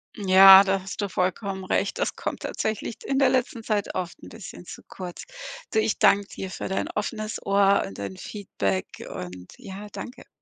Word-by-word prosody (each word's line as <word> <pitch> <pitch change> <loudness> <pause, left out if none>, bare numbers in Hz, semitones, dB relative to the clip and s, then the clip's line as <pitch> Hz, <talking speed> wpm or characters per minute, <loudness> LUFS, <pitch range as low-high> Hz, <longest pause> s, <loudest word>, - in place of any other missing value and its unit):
Ja, 195 -1 +9
da 195 -1 0
hast 195 +2 -6
du 200 - -2
vollkommen 190 +1 -2
recht. - - -1
Das - - -1
kommt - - -5
tatsächlich 220 +1 -3
d - - -13
in 270 0 +1
der 275 - +5
letzten 250 -2 0
Zeit 210 -2 -1
oft 175 -2 -4
'n - - -10
bisschen 215 -5 -10
zu - - -10
kurz. 180 -2 -8 0.5
Du, 220 - +2
ich 215 -1 0
danke 200 0 +4
dir 190 - -7
für - - -5
dein 190 - -2
offenes 215 +1 -4
Ohr 200 0 +4
und 95 - -9
dein 100 -1 -5
Feedback 100 - -3 0.2
und 90 0 -8
ja 205 -3 -9
danke. 250 - -9
195 Hz, 190 wpm, -25 LUFS, 185-215 Hz, 0.5 s, Ja